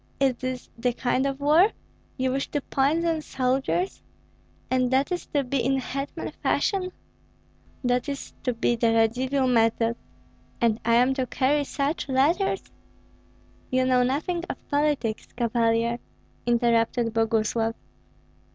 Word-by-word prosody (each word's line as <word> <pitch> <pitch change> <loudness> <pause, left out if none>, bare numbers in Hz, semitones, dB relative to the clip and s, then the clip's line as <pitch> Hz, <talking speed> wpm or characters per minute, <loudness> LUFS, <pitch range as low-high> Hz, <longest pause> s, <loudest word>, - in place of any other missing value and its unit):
Is 270 -2 +3
this 255 0 -4
the 245 +1 +1
kind 255 +2 0
of 275 0 -3
war? 315 +9 +4 0.4
You 260 -1 0
wish 270 +1 -1
to 290 - -1
poison 315 +5 +1
soldiers? 270 +7 -1 0.7
And 255 -1 +2
that 265 +5 +1
is 355 - -3
to 285 -2 0
be 260 -1 -1
in 270 +2 +2
hetman 275 +2 -4
fashion? 370 -2 0 0.9
That 245 +1 +1
is 280 -1 -6
to 250 - 0
be 235 +1 +1
the 230 -1 +2
Radzivill 255 +4 +2
method, 230 -1 +2 0.6
and 230 -1 +2
am 235 +2 +4
I - - +2
to 260 -1 -2
carry 285 +4 +1
such 285 +1 -2
letters?" 335 +9 +2 1.1
"You 255 0 +2
know 255 -1 +4
nothing 310 +8 0
of - - -7
politics, 285 -7 0
Cavalier," 235 0 +1 0.5
interrupted 235 -1 +2
Boguslav. 225 0 +1
255 Hz, 135 wpm, -25 LUFS, 235-280 Hz, 1.1 s, war